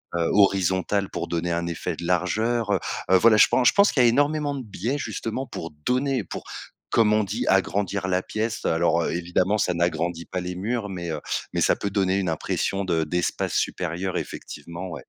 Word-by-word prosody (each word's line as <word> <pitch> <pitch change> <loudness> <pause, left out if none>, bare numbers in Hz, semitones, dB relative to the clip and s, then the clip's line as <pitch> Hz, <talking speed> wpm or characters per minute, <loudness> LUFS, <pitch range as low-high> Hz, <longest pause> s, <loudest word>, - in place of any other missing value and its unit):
heu, 85 -1 +1
horizontale 95 0 +2
pour - - -4
donner 85 0 -1
un 85 0 -1
effet 85 - -3
de 85 - -7
largeur, 105 +6 0
heu 95 - +2 0.3
heu, 95 - +8
voilà, 110 +2 +5
je - - +7
pen 130 - +2
je - - +6
pense 200 0 +5
qu'il 125 - +4
y - - +6
a - - +6
énormément 145 +2 +1
de 130 - -5
biais 110 +7 -3
justement 130 -1 -4
pour 85 -1 -7
donner, 130 -2 +1
pour, - - -7 0.5
comme 110 -2 +3
on 110 0 +3
dit: 100 +2 -3
«agrandir 95 0 +1
la 90 0 +1
pièce». 110 +3 -3
Alors, 85 0 +2
heu, - - -1
évidemment 90 +4 0
ça 90 -3 +1
n'agrandit 85 0 -1
pas 90 - -4
les 90 0 -5
murs 105 +3 -2
mais, 85 -3 -5
heu, 75 - -3 0.3
mais - - -2
ça - - +4
peut 100 - -3
donner 95 -1 +1
une 90 -3 -1
impression 95 +4 -1
de 85 -3 +1
d'espace 90 +3 -1
supérieur 90 +2 -2
effectivement, 85 +5 -7
ouais. 85 - -7
95 Hz, 205 wpm, -24 LUFS, 85-110 Hz, 0.5 s, heu